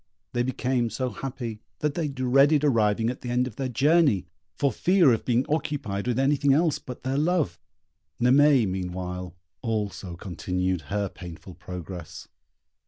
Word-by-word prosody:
They 120 - +1
became 125 -1 0
so 125 +3 -2
happy, 120 -5 -5 0.2
that 150 -1 -1
they 165 -1 -1
dreaded 135 +2 +3
arriving 115 -4 +2
at 125 - -9
the 125 - -5
end 125 +1 +2
of 125 -4 -8
their 135 -1 -2
journey, 140 - +3 0.3
for 140 -1 +1
fear 170 - +4
of 115 - -2
being 125 +1 +2
occupied 140 -9 -2
with 125 -1 0
anything 140 +1 +3
else 155 0 +2
but 125 - -9
their 135 +2 0
love. 155 - +1 0.6
Naimée, 130 -1 +5
meanwhile, 90 -1 -4 0.3
also 105 -5 -3
continued 90 0 -2
her 100 0 0
painful 90 0 -10
progress. 90 -1 -8
125 Hz, 150 wpm, -26 LUFS, 95-140 Hz, 0.6 s, Naimée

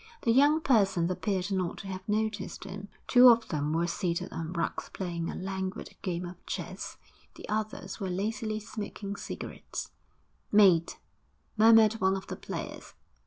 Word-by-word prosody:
The 230 - +3
young 290 +6 +5
persons 195 - +3
appeared 190 0 -1
not 185 -3 -1
to 195 - -8
have 190 +1 -7
noticed 215 0 -1
him. 195 +1 -7 0.2
Two 250 0 +8
of 230 -1 +4
them 150 -1 -1
were 165 +2 +1
seated 170 0 -2
on 165 0 -4
rugs 170 -2 -2
playing 170 -3 -3
a - - -4
languid 190 0 -4
game 180 -1 -2
of 175 0 -10
chess, - - -5 0.4
the - - -10
others 215 +1 -3
were 195 -3 -2
lazily 215 +3 -2
smoking 205 -2 -6
cigarettes. - - -6 0.6
'Mate!' 190 -6 +5 0.6
murmured 225 0 +6
one 190 0 +3
of 190 - -7
the - - -5
players. - - -7
195 Hz, 155 wpm, -29 LUFS, 180-215 Hz, 0.6 s, Two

